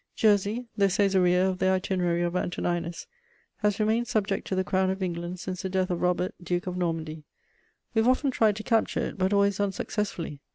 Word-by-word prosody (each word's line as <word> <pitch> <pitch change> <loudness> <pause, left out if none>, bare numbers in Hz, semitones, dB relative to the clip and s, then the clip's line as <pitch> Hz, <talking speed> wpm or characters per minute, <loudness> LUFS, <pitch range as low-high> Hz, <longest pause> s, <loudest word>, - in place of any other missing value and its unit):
Jersey, 210 +3 +2
the 200 -1 +3
Cæsarea 190 -2 +3
of 185 -1 -2
the - - +2
Itinerary 185 -2 +1
of 175 +1 -1
Antoninus, 175 -1 -2 0.5
has 210 -1 0
remained 220 +3 +1
subject 210 -3 -1
to 190 - -1
the 185 - +1
Crown 190 0 +1
of 190 0 -2
England 175 0 -4
since 185 0 -5
the 190 - -3
death 185 0 0
of 175 - -2
Robert, 180 0 +1
Duke 175 0 -2
of 180 -1 -4
Normandy; 165 -3 -3 0.7
we 225 - +2
have 225 +3 +4
often 265 +2 +2
tried 220 -4 +3
to 215 - -6
capture 225 -2 +1
it, - - -4
but 190 +1 +2
always 200 -1 +2
unsuccessfully. 195 -6 -3
190 Hz, 195 wpm, -27 LUFS, 175-205 Hz, 0.7 s, have